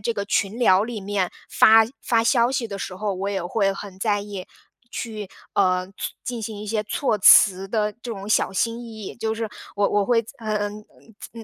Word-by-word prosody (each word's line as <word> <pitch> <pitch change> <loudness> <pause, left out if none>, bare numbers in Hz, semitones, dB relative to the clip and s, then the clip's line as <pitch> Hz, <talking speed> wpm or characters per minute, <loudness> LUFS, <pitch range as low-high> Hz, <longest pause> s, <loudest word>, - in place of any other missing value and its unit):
这 230 +3 -2
个 200 - -2
群 205 +1 0
聊 195 -3 +5
里 225 -2 -5
面 195 -2 -2 0.2
发 225 0 +7 0.2
发 230 -2 +2
消 235 +1 +3
息 245 -4 -1
的 200 -1 -6
时 185 - -5
候， 205 +2 -2
我 195 +2 -3
也 195 -3 -2
会 195 +2 +1
很 195 -1 -9
在 205 0 +1
意 200 -3 -7 0.5
去 215 -3 -5 0.3
呃， 185 -2 +2
措 195 - -19 0.3
进 245 -2 -4
行 210 -1 -6
一 210 - -7
些 215 0 -1
措 215 +2 -1
辞 195 -1 +6
的 210 +1 0
这 240 - -5
种 200 -1 -7
小 215 - +2
心 230 +4 -1
翼 220 -3 -9
翼。 - - -7
就 220 -1 -2
是 225 -1 -3 0.3
我 205 0 +2
我 205 -1 +1
会 230 +1 +3
在 225 - -13
呃， 215 -2 -3
呃， 205 - -5 0.6
在 230 - -9
210 Hz, 230 characters per minute, -23 LUFS, 195-225 Hz, 0.6 s, 发